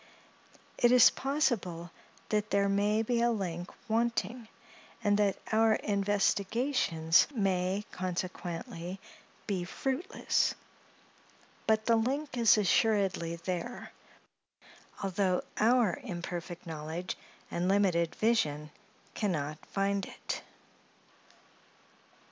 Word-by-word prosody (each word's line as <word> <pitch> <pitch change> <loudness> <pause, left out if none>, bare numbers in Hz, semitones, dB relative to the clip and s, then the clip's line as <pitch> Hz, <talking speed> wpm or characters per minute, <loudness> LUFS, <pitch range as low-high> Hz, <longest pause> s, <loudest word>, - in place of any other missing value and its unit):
It 240 - +5
is 250 -1 +8
possible, 220 - -1 0.4
that 210 -1 0
there 200 0 +2
may 205 +2 +2
be 235 +1 0
a 240 - +4
link 180 -6 -3 0.2
wanting, 230 0 -1 0.6
and 205 -1 +3
that 200 -2 +2
our 220 0 +4
investigations 200 - +2
may, 195 -1 0
consequently, 180 0 -4 0.5
be 190 -4 -1
fruitless; 270 - -1 1.1
but 220 0 +2
the 230 -1 +4
link 275 +5 -1
is 230 -3 +5
assuredly 195 -5 +2
there, 180 +8 -5 1.1
although 190 -1 +1 0.2
our 225 -4 +3
imperfect 175 -3 -6
knowledge 160 +2 -5 0.4
and 175 +1 -1
limited 180 -4 +2
vision 150 -10 +1 0.4
can 210 -3 -1
not 150 0 -4
find 200 0 -1
it. - - -5
200 Hz, 95 wpm, -31 LUFS, 175-225 Hz, 1.1 s, is